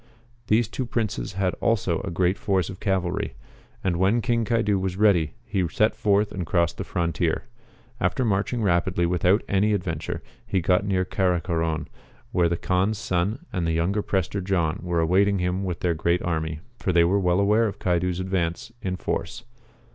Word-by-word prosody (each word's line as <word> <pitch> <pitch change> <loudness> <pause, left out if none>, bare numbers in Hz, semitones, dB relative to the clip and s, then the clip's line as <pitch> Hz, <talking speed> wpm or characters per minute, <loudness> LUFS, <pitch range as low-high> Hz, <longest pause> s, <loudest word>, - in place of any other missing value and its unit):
These 110 +1 +3
two 125 +3 -4
j)rinces 110 -4 -2
had 95 -1 0
also 95 -7 +1
a 100 - -4
great 90 +1 +1
force 95 -3 0
of 95 - -10
cavalry. 95 -4 -1 0.5
And 90 -3 +1
when 95 +6 +3
King 115 -1 +1
Caidu 105 -3 +1
was 95 -1 -2
ready 90 -7 +3
he 100 -6 0
set 110 +7 +1
forth 105 -1 +2
and 95 - -3
crossed 85 0 0
the - - -1
frontier. 85 -1 -1 0.6
After 130 +1 +1
marching 110 +3 0
rapidly 85 -1 +2
without 90 +4 +2
any 105 +2 +2
adven 80 -5 -4
ture, 80 - -5 0.2
he 95 - 0
got 90 +3 +2
near 95 -2 +1
Caracoron, 85 -4 0 0.4
where 85 -2 +2
the 85 - 0
Kaan's 95 +5 0
son 105 - -1
and 85 -3 -1
the 80 - +1
younger 90 +6 +1
Prester 95 0 -1
John 90 -4 0
were 85 -1 0
awaiting 100 +4 +3
him 90 +1 -1
with 90 -3 -3
their 90 -2 +2
great 85 +2 0
army, 80 -2 -2 0.2
for 95 - 0
they 85 -1 +5
were 95 +4 +3
well 90 -1 +2
aware 105 +3 +3
of 100 -1 -5
Caidu's 90 -1 0
advance 95 0 -2
in 95 -1 -2
force. 90 +5 -3
95 Hz, 180 wpm, -25 LUFS, 85-100 Hz, 0.6 s, they